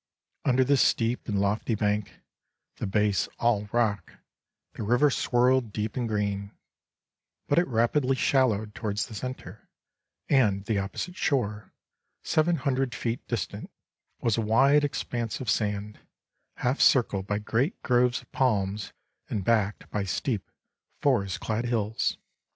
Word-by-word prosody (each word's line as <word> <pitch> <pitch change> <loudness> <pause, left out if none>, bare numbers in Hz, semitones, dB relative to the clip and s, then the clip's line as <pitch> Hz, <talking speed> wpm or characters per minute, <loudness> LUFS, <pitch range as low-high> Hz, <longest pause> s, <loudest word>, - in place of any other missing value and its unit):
Under 130 -1 +4
this 135 0 +3
steep 115 +1 +1
and 100 -3 0
lofty 105 +3 0
bank, 105 -1 -1 0.6
the - - -3
base 105 0 +1
all 105 -3 +1
rock, 105 -7 0 0.6
the - - -7
river 120 +7 +3
swirled 125 -2 +2
deep 105 0 -3
and 120 -3 -2
green; 100 -1 -2 0.9
but 145 - +4
it 175 - +1
rapidly 125 +3 +2
shallowed 110 -6 +1
towards 105 -1 -2
the 120 - -11
centre, 110 -4 -7 0.6
and 105 -8 +2
the 105 -1 0
opposite 100 - -4
shore, 110 - -1 0.5
seven 165 +2 +2
hundred 135 -4 -1
feet 115 +1 -3
distant, 115 -8 -4 0.5
was 115 -3 +1
a - - +2
wide 135 +7 +4
expanse 120 -5 -2
of 125 -5 -1
sand, 105 0 -2 0.6
half 125 +3 -1
circled 100 -7 +3
by 105 - 0
great 115 - -1
groves 125 0 +2
of - - -27
palms, 105 -5 0 0.4
and 100 - -2
backed 105 -3 +1
by 105 - -1
steep, 100 +3 -2 0.5
forest 100 -10 +1
clad 110 +2 -2
hills. 110 -2 0
115 Hz, 135 wpm, -27 LUFS, 105-130 Hz, 0.9 s, Under